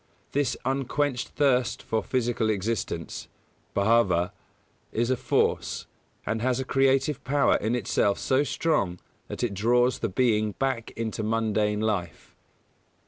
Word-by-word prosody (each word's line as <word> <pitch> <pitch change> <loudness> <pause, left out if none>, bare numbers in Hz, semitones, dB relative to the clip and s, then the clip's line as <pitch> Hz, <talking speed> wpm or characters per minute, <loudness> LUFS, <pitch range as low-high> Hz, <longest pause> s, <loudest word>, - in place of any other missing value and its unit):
This 145 -1 0
unquenched 135 0 0
thirst 130 -5 +1
for 110 0 -1
physical 120 -3 0
existence 100 -5 -3 0.5
(bhāva) 100 -4 +3 0.6
is 120 +2 0
a - - +3
force, - - 0 0.4
and 110 +1 -1
has 130 +1 +1
a 130 - -2
creative 135 +2 +2
power 140 0 +3
in 110 +3 -1
itself 100 -3 +1
so 130 +2 +2
strong 140 - 0 0.3
that - - -5
it 115 -4 0
draws 120 +5 +2
the 115 - -1
being 110 0 +1
back 130 -2 -2
into 115 -1 -3
mundane 110 -1 0
life. 100 -7 -3
115 Hz, 130 wpm, -26 LUFS, 105-130 Hz, 0.6 s, bhāva